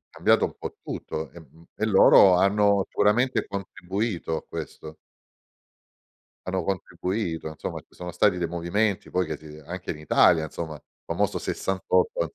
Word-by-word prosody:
Cambiato -, -, +3 dB
un -, -, -6 dB
po' -, -, -6 dB
tutto, 80 Hz, 0 st, -5 dB
e 85 Hz, -, -12 dB
mhmm, 80 Hz, +1 st, -18 dB
e 110 Hz, -, -2 dB
loro 95 Hz, -2 st, +7 dB
hanno 100 Hz, +1 st, +3 dB
sicuramente 120 Hz, +5 st, +2 dB
contribuito 95 Hz, -2 st, -3 dB
a -, -, -5 dB
questo 80 Hz, 0 st, -8 dB, 1.5 s
hanno 95 Hz, -1 st, -1 dB
contribuito, 90 Hz, -1 st, -3 dB
insomma, 80 Hz, 0 st, -6 dB
ci -, -, -21 dB
sono 90 Hz, 0 st, -6 dB
stati 95 Hz, +1 st, +2 dB
dei 85 Hz, -1 st, -1 dB
movimenti 90 Hz, +5 st, -1 dB
poi 90 Hz, 0 st, 0 dB
che 80 Hz, -, -4 dB
ti 80 Hz, -, -18 dB, 0.2 s
anche 90 Hz, +3 st, -5 dB
in 80 Hz, -, -7 dB
Italia, 80 Hz, +1 st, +4 dB
insomma, 80 Hz, 0 st, -5 dB
il 75 Hz, -, -13 dB, 0.2 s
famoso -, -, 0 dB
68 90 Hz, -3 st, 0 dB
90 Hz, 150 wpm, -25 LUFS, 80-100 Hz, 1.5 s, loro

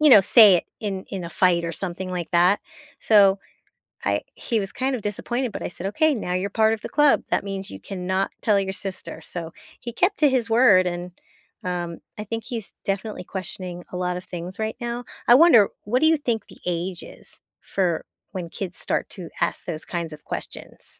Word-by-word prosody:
you 305 Hz, -, +6 dB
know, 210 Hz, -, +10 dB
say 210 Hz, -1 st, +8 dB
it -, -, -2 dB, 0.2 s
in 195 Hz, -3 st, -3 dB
in 190 Hz, -3 st, -4 dB
a -, -, -5 dB
fight 175 Hz, -2 st, +3 dB
or 165 Hz, -, -3 dB
something 185 Hz, +2 st, -4 dB
like 175 Hz, -2 st, -4 dB
that, 180 Hz, +4 st, +4 dB, 0.4 s
so 200 Hz, -3 st, +5 dB, 0.7 s
I -, -, +1 dB
he 230 Hz, -3 st, -1 dB
was, 195 Hz, -, -4 dB
kind 265 Hz, +1 st, -1 dB
of 220 Hz, -, -8 dB
disappointed, 240 Hz, +3 st, -1 dB
but -, -, -6 dB
I -, -, -2 dB
said, 175 Hz, +2 st, -4 dB
"Okay, 310 Hz, +8 st, +2 dB
now 180 Hz, -6 st, -3 dB
you're 190 Hz, +2 st, -1 dB
part 220 Hz, +1 st, +3 dB
of 215 Hz, -, -8 dB
the -, -, -5 dB
club. 295 Hz, -1 st, +4 dB
That -, -, +1 dB
means 195 Hz, 0 st, -5 dB
you -, -, -8 dB
cannot 190 Hz, 0 st, -2 dB
tell 210 Hz, -3 st, +3 dB
your 190 Hz, 0 st, -2 dB
sister," 190 Hz, 0 st, -3 dB
so 170 Hz, -2 st, -5 dB, 0.3 s
he 235 Hz, -, -6 dB
kept 365 Hz, -, +1 dB
to 295 Hz, -, +6 dB
his 245 Hz, -3 st, +1 dB
word, 220 Hz, -6 st, +6 dB
and, 175 Hz, 0 st, -3 dB, 0.5 s
um, 175 Hz, -2 st, -3 dB, 0.2 s
I 210 Hz, -, -4 dB
think 225 Hz, +2 st, -4 dB
he's 225 Hz, -5 st, -4 dB
definitely 195 Hz, -1 st, -3 dB
questioning 180 Hz, -1 st, -6 dB
a -, -, -4 dB
lot 180 Hz, 0 st, -1 dB
of 185 Hz, -, -10 dB
things 180 Hz, +2 st, -7 dB
right 220 Hz, 0 st, -2 dB
now. 240 Hz, +1 st, -4 dB, 0.2 s
I 240 Hz, -, +9 dB
wonder, 265 Hz, -, +7 dB, 0.2 s
what 245 Hz, +5 st, +1 dB
do 315 Hz, -, +4 dB
you 320 Hz, -, +5 dB
think 235 Hz, -6 st, -2 dB
the -, -, -15 dB
age 175 Hz, 0 st, -2 dB
is -, -, -7 dB, 0.2 s
for 180 Hz, -4 st, -1 dB, 0.3 s
when 180 Hz, -3 st, -5 dB
kids 180 Hz, 0 st, -5 dB
start -, -, 0 dB
to 180 Hz, -4 st, -8 dB
ask -, -, 0 dB
those 160 Hz, -3 st, -4 dB
kinds 170 Hz, -3 st, -4 dB
of 150 Hz, -, -15 dB
questions? -, -, -7 dB
195 Hz, 210 wpm, -24 LUFS, 180-225 Hz, 0.7 s, know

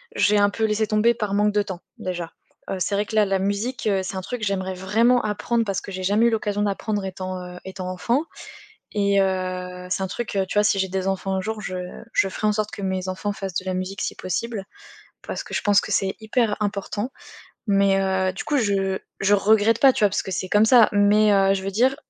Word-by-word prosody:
j'ai 205 Hz, +1 st, +3 dB
un 205 Hz, 0 st, +4 dB
peu 220 Hz, +2 st, -3 dB
laissé 215 Hz, 0 st, +1 dB
tomber 215 Hz, +3 st, +3 dB
par 210 Hz, -3 st, -3 dB
manque 210 Hz, +1 st, +2 dB
de 210 Hz, -, +3 dB
temps, 190 Hz, -3 st, -7 dB, 0.2 s
déjà. 175 Hz, -2 st, -4 dB, 0.4 s
Heu, 190 Hz, -, -2 dB
c'est 200 Hz, +2 st, 0 dB
vrai 205 Hz, +1 st, 0 dB
que, 220 Hz, -, -10 dB
là, 215 Hz, -1 st, +5 dB
la 195 Hz, -1 st, 0 dB
musique, 205 Hz, +6 st, -2 dB
heu, 195 Hz, -2 st, +2 dB
c'est 190 Hz, -, -5 dB
un 190 Hz, -, -3 dB
truc, 245 Hz, +4 st, -5 dB
j'aimerais 190 Hz, -2 st, -1 dB
vraiment 225 Hz, +7 st, +2 dB
apprendre 225 Hz, +2 st, -1 dB
parce 195 Hz, -3 st, -2 dB
que 195 Hz, -, -9 dB
j'ai 185 Hz, 0 st, -5 dB
jamais 210 Hz, +5 st, +3 dB
eu -, -, +4 dB
l'occasion 210 Hz, -2 st, -1 dB
d'apprendre 205 Hz, 0 st, -1 dB
étant, 185 Hz, 0 st, -5 dB
heu, 180 Hz, 0 st, -9 dB
étant 190 Hz, -1 st, -6 dB
enfant 240 Hz, -, 0 dB, 0.7 s
et 200 Hz, -1 st, +2 dB
heu, 185 Hz, -1 st, -2 dB
c'est 190 Hz, +1 st, -1 dB
un -, -, -1 dB
truc, 215 Hz, +3 st, -5 dB
heu, 190 Hz, -, +2 dB
tu -, -, -6 dB
vois, 210 Hz, -, +5 dB
si 200 Hz, -1 st, +2 dB
j'ai 190 Hz, -, +1 dB
des 190 Hz, 0 st, -2 dB
enfants 195 Hz, 0 st, -2 dB
un 190 Hz, -, -1 dB
jour, 220 Hz, +2 st, -4 dB
je 185 Hz, -, -5 dB, 0.4 s
je 195 Hz, -, +2 dB
ferai 215 Hz, -, -2 dB
en 210 Hz, -, +3 dB
sorte 210 Hz, 0 st, -2 dB
que 200 Hz, -, -7 dB
mes 190 Hz, -1 st, -2 dB
enfants 205 Hz, +2 st, -3 dB
fassent 195 Hz, -3 st, -6 dB
de 185 Hz, -, -2 dB
la 185 Hz, -, -1 dB
musique, 185 Hz, +2 st, -4 dB
si -, -, -2 dB
possible. 200 Hz, +3 st, -3 dB, 0.6 s
Parce -, -, -4 dB
que -, -, -12 dB
je -, -, +1 dB
pense 205 Hz, -3 st, +4 dB
que -, -, -5 dB
c'est 190 Hz, 0 st, 0 dB
hyper 220 Hz, -1 st, 0 dB
important, 205 Hz, +3 st, -3 dB, 0.5 s
mais, 195 Hz, -1 st, +3 dB
heu, 190 Hz, -1 st, +1 dB
du 190 Hz, -, -6 dB
coup, 295 Hz, -, +1 dB
je 195 Hz, -4 st, 0 dB, 0.2 s
je 200 Hz, +1 st, +4 dB
regrette 215 Hz, +2 st, +3 dB
pas, 270 Hz, -1 st, +7 dB
tu 215 Hz, -, +1 dB
vois? 205 Hz, -, +4 dB
Parce -, -, -1 dB
que 190 Hz, -, -7 dB
c'est 185 Hz, +1 st, -3 dB
comme 210 Hz, +2 st, +4 dB
ça, 235 Hz, -2 st, +7 dB
mais, 205 Hz, +1 st, +4 dB
heu, 195 Hz, -1 st, +4 dB
je 190 Hz, -, -3 dB
veux 195 Hz, -, -2 dB
dire, 255 Hz, +6 st, +2 dB
200 Hz, 245 wpm, -23 LUFS, 190-215 Hz, 0.7 s, pas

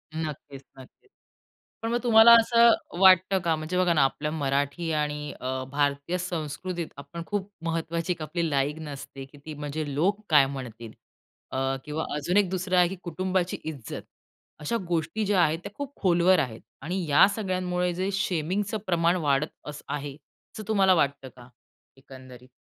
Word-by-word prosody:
नक्कीच, 150 Hz, -3 st, -6 dB
नक्कीच. 130 Hz, -, -16 dB, 0.7 s
पण 225 Hz, 0 st, -2 dB
मग 240 Hz, -, +2 dB
तुम्हाला 230 Hz, -1 st, +8 dB
असं 235 Hz, +1 st, +5 dB, 0.3 s
वाटतं 190 Hz, 0 st, +6 dB
का, 170 Hz, -1 st, +1 dB
म्हणजे 155 Hz, +3 st, -4 dB
बघा 180 Hz, -2 st, +3 dB
ना 155 Hz, -, +3 dB
अ, -, -, +5 dB
आपल्या 150 Hz, +3 st, -2 dB
मराठी 145 Hz, +2 st, -1 dB
आणि 150 Hz, -1 st, -2 dB
अ, 130 Hz, 0 st, -3 dB
भारतीय 145 Hz, +4 st, 0 dB
संस्कृतीत 175 Hz, 0 st, -4 dB
आपण 170 Hz, +4 st, -8 dB
खूप 205 Hz, -1 st, -3 dB, 0.2 s
महत्वाची 165 Hz, +1 st, -1 dB
एक 165 Hz, -, -13 dB
आपली 165 Hz, +2 st, -2 dB
लाइन 150 Hz, +2 st, -1 dB
असते 140 Hz, -1 st, -8 dB
की 140 Hz, +2 st, -18 dB
ती 155 Hz, -, -6 dB
म्हणजे 145 Hz, 0 st, -4 dB
लोक 190 Hz, +9 st, +1 dB
काय 150 Hz, -4 st, +6 dB
म्हणतील? 120 Hz, -5 st, -7 dB, 0.6 s
अ, 135 Hz, 0 st, -1 dB
किंवा 150 Hz, +2 st, -3 dB
अजून 160 Hz, +6 st, 0 dB
एक 200 Hz, -3 st, +3 dB
दुसरं 185 Hz, 0 st, -1 dB
आहे 180 Hz, -1 st, +6 dB
की 190 Hz, -, -5 dB
कुटुंबाची 185 Hz, +1 st, -1 dB
इज्जत. 145 Hz, -8 st, -6 dB, 0.6 s
अशा 155 Hz, +10 st, -1 dB
गोष्टी 175 Hz, +6 st, -1 dB
ज्या 195 Hz, -2 st, +3 dB
आहेत, 160 Hz, -1 st, +2 dB
त्या 200 Hz, -, -7 dB
खूप 285 Hz, -1 st, -6 dB
खोलवर 180 Hz, -1 st, +4 dB
आहेत 120 Hz, -7 st, -3 dB, 0.2 s
आणि 175 Hz, +5 st, -3 dB
या 145 Hz, +6 st, +7 dB
सगळ्यांमुळे 180 Hz, -3 st, -1 dB
जे 185 Hz, +2 st, -2 dB
शेमिंगचं 195 Hz, +3 st, -1 dB
प्रमाण 170 Hz, -1 st, +2 dB
वाढत 140 Hz, +1 st, +2 dB, 0.2 s
असं 150 Hz, 0 st, -8 dB
आहे, 145 Hz, -1 st, -4 dB, 0.4 s
असं 215 Hz, -, -6 dB
तुम्हाला 195 Hz, -3 st, +4 dB
वाटतं 140 Hz, -5 st, 0 dB
का 120 Hz, -1 st, -14 dB, 0.5 s
एकंदरीत? 130 Hz, -1 st, -14 dB
160 Hz, 165 wpm, -26 LUFS, 145-185 Hz, 0.7 s, तुम्हाला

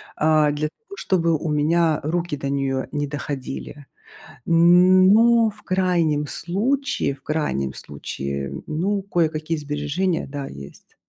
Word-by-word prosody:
а, 155 Hz, -1 st, +3 dB
для 150 Hz, +1 st, -2 dB
того, 400 Hz, -, -15 dB
чтобы 165 Hz, -4 st, +1 dB
у 155 Hz, -, -4 dB
меня 155 Hz, +1 st, +2 dB
руки 170 Hz, 0 st, -2 dB
до 140 Hz, 0 st, -4 dB
неё 135 Hz, -1 st, -1 dB
не 145 Hz, -1 st, -2 dB
доходили. 140 Hz, 0 st, -6 dB, 0.6 s
Но 185 Hz, +7 st, +5 dB
в 210 Hz, 0 st, -19 dB
крайнем 175 Hz, -5 st, +1 dB
случае, 210 Hz, -, -1 dB
в 135 Hz, -, -21 dB
крайнем 70 Hz, -, -2 dB
случае, 70 Hz, -1 st, -5 dB
ну, 195 Hz, +6 st, -1 dB
кое-какие 165 Hz, -4 st, -1 dB
сбережения, 150 Hz, +5 st, -2 dB
да, 140 Hz, 0 st, -6 dB
есть. 70 Hz, 0 st, -12 dB
155 Hz, 125 wpm, -22 LUFS, 145-180 Hz, 0.6 s, Но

